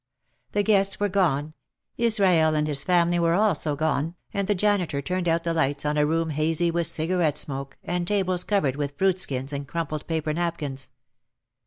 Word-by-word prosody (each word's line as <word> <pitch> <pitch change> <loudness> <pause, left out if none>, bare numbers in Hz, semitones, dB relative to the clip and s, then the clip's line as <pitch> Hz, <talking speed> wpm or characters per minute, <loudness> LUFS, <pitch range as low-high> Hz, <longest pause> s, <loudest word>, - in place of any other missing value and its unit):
The 205 - +2
guests 195 -2 +3
were 205 0 +1
gone, 155 -6 0 0.4
Israel 190 -9 +3
and 150 0 +1
his 145 -2 -2
family 175 -1 +2
were 170 0 +2
also 175 -7 +2
gone, 160 +2 -1 0.2
and 200 -1 -1
the 205 - +2
janitor 185 -7 +1
turned 180 +5 -2
out 165 0 +1
the 170 - -1
lights 145 -3 0
on 150 0 0
a 150 0 +2
room 165 +1 0
hazy 160 +3 +1
with 170 -1 +1
cigarette 165 -2 0
smoke 135 -2 -4
and 175 0 -2
tables 185 -3 +1
covered 150 -11 0
with 140 -1 -4
fruit 190 -1 +2
skins 135 -3 -1
and 140 0 -4
crumpled 155 -1 -4
paper 160 -2 -1
napkins. 150 -6 -3
165 Hz, 180 wpm, -25 LUFS, 150-185 Hz, 0.4 s, guests